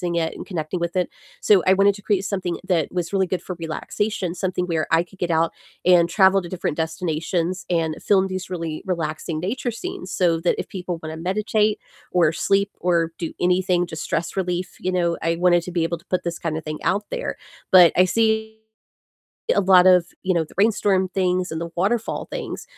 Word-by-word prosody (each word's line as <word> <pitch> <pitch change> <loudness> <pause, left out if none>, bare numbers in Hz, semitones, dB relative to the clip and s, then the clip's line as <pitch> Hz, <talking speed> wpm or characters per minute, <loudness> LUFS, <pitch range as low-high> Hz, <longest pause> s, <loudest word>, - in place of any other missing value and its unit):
it 165 -1 0
and - - -7
connecting 170 -1 -3
with 170 +1 -3
it, 180 -1 +1 0.3
so 200 -3 +5
I 190 - +7
wanted 200 +1 +4
to 205 - -11
create 200 -1 0
something 185 -3 -2
that 170 -5 +1
was 180 0 -3
really 190 -1 +2
good 185 0 -3
for 185 - -5
relaxation, 175 +3 -3
something 180 -1 -2
where 165 -3 -1
I 165 +1 +4
could 185 +2 -20
get 175 - -1
out 165 0 +2 0.3
and 175 -1 +5
travel 195 +1 +4
to 175 - -9
different 170 -4 -3
destinations 165 +2 -2
and 165 -3 0
film 195 -2 +3
these 185 -1 -5
really 165 -4 -4
relaxing 160 -2 -2
nature 240 +9 -2
scenes, 365 - -6
so 170 -3 +2
that 170 +1 +1
if - - -4
people 180 -3 -5
wanna 160 0 -6
meditate 210 +4 0 0.3
or 170 -4 +3
sleep 200 +4 +1
or 170 -2 +1
do 165 - -4
anything, 180 0 +2
just 160 -3 -7
stress 165 +1 -2
relief, 180 -1 -2
you 185 - -2
know, 170 -2 +1
I 165 +1 +1
wanted 175 0 +4
to 180 - -7
be 170 -2 0
able 165 0 -2
to 170 - -24
put 185 -1 0
this 170 0 -4
kinda 160 -1 -3
thing 155 -1 -6
out 200 +2 +1
there, - - -3 0.4
but 180 -3 +8
I 180 - +6
see 220 +2 0 1.0
a - - +5
lot 185 -2 +6
of, 180 -2 +5 0.2
you 185 - +1
know, 170 -2 +1
the 155 - -18
rainstorm 200 -2 +2
things 185 -1 0
and 160 0 -4
the 170 - -4
waterfall 215 +6 -1
things, - - -5
180 Hz, 205 wpm, -22 LUFS, 170-190 Hz, 1.0 s, but